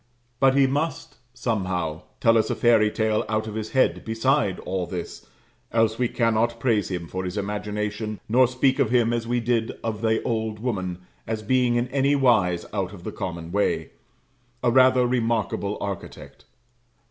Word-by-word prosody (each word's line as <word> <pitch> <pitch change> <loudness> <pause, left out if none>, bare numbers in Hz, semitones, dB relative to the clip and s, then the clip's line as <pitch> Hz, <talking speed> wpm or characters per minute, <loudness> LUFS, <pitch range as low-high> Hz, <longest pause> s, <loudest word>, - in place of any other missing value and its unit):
But 135 0 +4
he 140 -1 +5
must, 145 +5 -2
somehow, 90 -9 -2 0.2
tell 115 -2 +4
us 110 - +2
a - - 0
fairy 115 -3 +4
tale 110 +1 0
out 110 0 0
of 110 - -6
his 110 0 -5
head 130 - +2
beside 115 -2 +1
all 90 -1 -3
this, 90 -2 -7 0.4
else 115 0 +2
we 125 - +2
cannot 115 0 +1
praise 115 -6 +1
him 90 -3 -4
for 95 +2 -4
his 90 +2 -4
imagination, 105 +1 -3
nor 125 +3 +4
speak 130 +2 +1
of 135 -6 +3
him 120 -1 +3
as 115 -1 -2
we 120 +1 +1
did 115 -1 0
of 110 -2 -3
the 110 -1 +2
old 110 -2 -2
woman, 95 -6 -3 0.2
as 110 -1 -3
being 125 +1 +2
in 120 +1 +1
any 140 +2 +2
wise 110 -10 +2
out 95 -2 -2
of 90 -4 -11
the - - -5
common 85 -2 -5
way, 100 +2 0 0.7
a 120 - +3
rather 130 0 +5
remarkable 115 -5 -1
architect. 100 -3 -7
110 Hz, 170 wpm, -24 LUFS, 100-120 Hz, 0.7 s, he